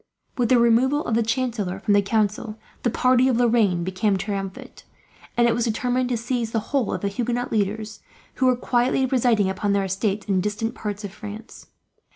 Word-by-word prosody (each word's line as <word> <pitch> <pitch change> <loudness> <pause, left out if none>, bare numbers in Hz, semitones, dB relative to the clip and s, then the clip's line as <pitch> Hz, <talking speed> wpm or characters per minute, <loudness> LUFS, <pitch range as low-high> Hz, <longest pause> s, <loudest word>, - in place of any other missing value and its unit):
With 245 -3 0
the 255 - +5
removal 240 +5 +3
of 235 - -2
the 230 - +3
chancellor 225 -5 -1
from 210 0 +1
the 205 - +5
council, 215 +1 -1 0.2
the 240 - +1
party 255 +2 +3
of 250 -3 +2
Lorraine 225 -7 +2
became 190 +2 0
triumphant; 195 -1 -6 0.5
and 240 0 +5
it 235 - +3
was 235 0 0
determined 245 +2 0
to 245 - 0
seize 235 -1 -2
the 225 - +2
whole 265 -6 +1
of - - -3
the 200 - -1
Huguenot 240 +4 -2
leaders, 215 0 -2 0.4
who 260 - +3
were 255 - +4
quietly 245 +2 +1
residing 240 -6 +2
upon 200 +2 -1
their 200 -1 +1
estates 195 +2 -2
in 190 -2 +1
distant 210 +3 -2
parts 205 -1 -5
of 200 -2 -6
France. 215 +1 -10
225 Hz, 195 wpm, -23 LUFS, 205-245 Hz, 0.5 s, the